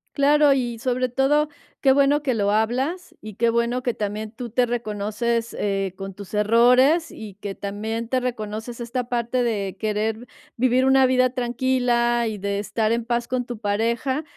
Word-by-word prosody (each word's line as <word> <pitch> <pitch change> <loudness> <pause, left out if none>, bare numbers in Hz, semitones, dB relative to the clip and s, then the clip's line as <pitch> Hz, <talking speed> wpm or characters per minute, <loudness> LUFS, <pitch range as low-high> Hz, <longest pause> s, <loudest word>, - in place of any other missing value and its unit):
Claro, 290 0 +5
y 240 -4 -2
sobre 255 +1 0
todo, 290 +4 +2 0.3
qué 270 - +5
bueno 280 +2 +3
que 260 -4 0
lo 205 -2 +1
hablas 255 - -1
y 215 0 -9
qué 235 +4 +1
bueno 235 +2 0
que 245 - 0
también 210 +1 -4
tú 240 +1 -7
te 245 +3 +2
reconoces, 230 0 -2
eh, 195 -2 -1
con 195 0 -6
tus 200 +1 -11
errores 250 +10 +4
y 215 -2 -9
que 200 - -4
también 220 +4 -4
te 255 +2 0
reconoces 230 -1 -5
esta 240 +1 -4
parte 245 +1 0
de 205 -5 -2
querer 220 +2 -2 0.3
vivir 255 +1 +2
una 265 0 +5
vida 255 0 +3
tranquila 240 -1 +1
y 215 - -5
de 200 0 -2
estar 215 +2 0
en 235 0 -1
paz 235 0 -1
con 255 -1 -2
tu 240 -2 -7
pareja, 235 +7 -1
235 Hz, 175 wpm, -23 LUFS, 215-255 Hz, 0.3 s, Claro